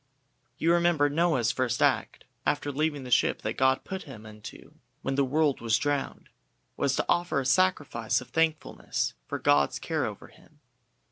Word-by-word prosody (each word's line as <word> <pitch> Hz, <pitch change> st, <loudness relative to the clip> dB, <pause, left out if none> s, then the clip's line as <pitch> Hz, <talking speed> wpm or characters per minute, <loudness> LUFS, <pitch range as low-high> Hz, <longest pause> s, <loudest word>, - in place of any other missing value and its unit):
You 165 Hz, +2 st, +2 dB
remember 170 Hz, -4 st, +3 dB
Noah's 150 Hz, -7 st, +2 dB
first 125 Hz, -2 st, -1 dB
act -, -, +1 dB, 0.2 s
after 145 Hz, 0 st, -1 dB
leaving 145 Hz, 0 st, -1 dB
the 125 Hz, -, -8 dB
ship -, -, +2 dB
that 110 Hz, -, -1 dB
God 130 Hz, +1 st, +2 dB
put 190 Hz, 0 st, -5 dB
him 115 Hz, -7 st, -11 dB
into 105 Hz, 0 st, -12 dB, 0.3 s
when 135 Hz, -, -1 dB
the 140 Hz, +1 st, +2 dB
world 145 Hz, +1 st, +1 dB
was 115 Hz, -1 st, +2 dB
drowned, 145 Hz, +2 st, -3 dB, 0.5 s
was 140 Hz, -1 st, 0 dB
to -, -, 0 dB
offer 175 Hz, -4 st, +1 dB
a 135 Hz, -, -3 dB
sacrifice 145 Hz, -8 st, +1 dB
of 125 Hz, -, -12 dB
thankfulness 160 Hz, -1 st, -1 dB
for -, -, -3 dB
God's 70 Hz, -1 st, +2 dB
care -, -, -2 dB
over -, -, -9 dB
him. 150 Hz, -, -22 dB
140 Hz, 165 wpm, -28 LUFS, 125-160 Hz, 0.5 s, remember